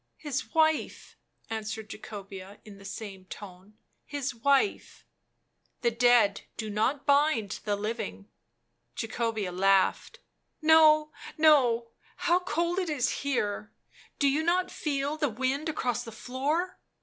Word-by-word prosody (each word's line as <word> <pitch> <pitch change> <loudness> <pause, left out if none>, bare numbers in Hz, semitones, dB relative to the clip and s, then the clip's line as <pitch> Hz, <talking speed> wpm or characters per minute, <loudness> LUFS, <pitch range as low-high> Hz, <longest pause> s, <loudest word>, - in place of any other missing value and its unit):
" - - -49
His 290 +1 -3
wife," 315 -1 +1 0.3
answered 220 -1 -5
Jacobea 195 -1 -9
in 200 -2 -12
the 195 - -14
same 195 -2 -7
tone; 195 +2 -11
" - - -46
his 275 -2 -2
wife." 280 - 0 0.4
" - - -46
The 235 - +3
dead 235 -4 +4 0.2
do 215 -2 -4
not 250 +7 0
bind 280 -8 +2
the 205 -1 +1
living." 210 -1 -4 0.7
Jacobea 225 -4 -2
laughed. 195 - +2 0.4
"No, 310 -1 +6 0.3
no 255 -7 +4
— - - -30
how 350 +1 +4
cold 350 0 -1
it 365 -3 -2
is 265 -5 +1
here; 215 -6 -1 0.5
do 280 - +3
you 280 +3 +2
not 360 +3 +1
feel 285 0 -2
the 295 -2 +1
wind 260 +7 -1
across 250 -7 -1
the 230 - -9
floor?" 280 +10 -2
245 Hz, 135 wpm, -28 LUFS, 210-305 Hz, 0.7 s, No